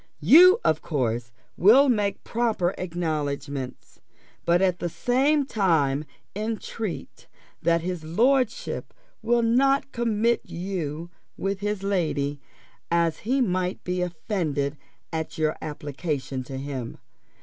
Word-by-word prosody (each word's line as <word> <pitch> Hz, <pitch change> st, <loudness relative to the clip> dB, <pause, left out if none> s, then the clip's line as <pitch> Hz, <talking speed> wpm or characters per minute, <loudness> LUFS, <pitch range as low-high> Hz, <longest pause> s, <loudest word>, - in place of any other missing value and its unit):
You 360 Hz, -, +8 dB
of -, -, +2 dB
course 120 Hz, -6 st, -2 dB, 0.2 s
will 245 Hz, +10 st, +6 dB
make 210 Hz, -5 st, 0 dB
proper 220 Hz, -6 st, 0 dB
acknowledgments; 150 Hz, -6 st, -4 dB, 0.4 s
but 170 Hz, +1 st, +4 dB
at 185 Hz, -2 st, +2 dB
the 175 Hz, -, -2 dB
same 275 Hz, -, +2 dB
time 160 Hz, -, +1 dB, 0.3 s
entreat 215 Hz, -2 st, -5 dB, 0.3 s
that 170 Hz, 0 st, +2 dB
his 180 Hz, -1 st, -4 dB
lordship 235 Hz, -, 0 dB, 0.3 s
will 235 Hz, +1 st, +2 dB
not 270 Hz, +4 st, +3 dB
commit 235 Hz, 0 st, +1 dB
you 170 Hz, -3 st, -5 dB, 0.3 s
with 195 Hz, 0 st, -2 dB
his 205 Hz, -1 st, -2 dB
lady, 150 Hz, -7 st, -1 dB, 0.5 s
as 170 Hz, -1 st, +1 dB
she 260 Hz, +5 st, 0 dB
might 185 Hz, -4 st, -1 dB
be 180 Hz, 0 st, -2 dB
offended 160 Hz, -5 st, -2 dB, 0.4 s
at 160 Hz, -1 st, -3 dB
your 155 Hz, -1 st, +1 dB
application 145 Hz, -3 st, -4 dB
to 135 Hz, +1 st, -6 dB
him. 135 Hz, -3 st, -5 dB
180 Hz, 115 wpm, -25 LUFS, 155-225 Hz, 0.5 s, You